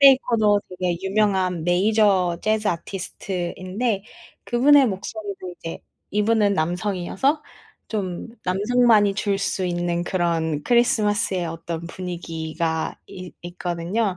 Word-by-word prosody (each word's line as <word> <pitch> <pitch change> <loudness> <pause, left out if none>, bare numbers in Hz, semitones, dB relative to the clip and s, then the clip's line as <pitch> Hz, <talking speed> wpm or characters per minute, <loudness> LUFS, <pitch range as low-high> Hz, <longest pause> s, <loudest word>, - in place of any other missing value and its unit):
베이커도 230 -7 +5
되게 180 -1 -2
유명한 190 -3 +1
메이저 185 -1 +3
재즈 215 0 +1
아티스트인데 185 +3 -3 0.4
그분의 275 +3 +5
목소리도 200 -2 -5
이제 165 - -6 0.3
이분은 210 0 +2
남성이어서 185 - 0 0.5
좀 190 -3 -3 0.2
남성만이 210 +2 +3
줄 200 0 0
수 195 -1 -1
있는 175 0 -1
그런 165 -4 0
크리스마스의 210 -6 +2
어떤 165 0 -5
분위기가 165 -2 -3
있 185 -1 -9
있거든요. 175 +3 -2
190 Hz, 275 characters per minute, -23 LUFS, 175-215 Hz, 0.5 s, 베이커도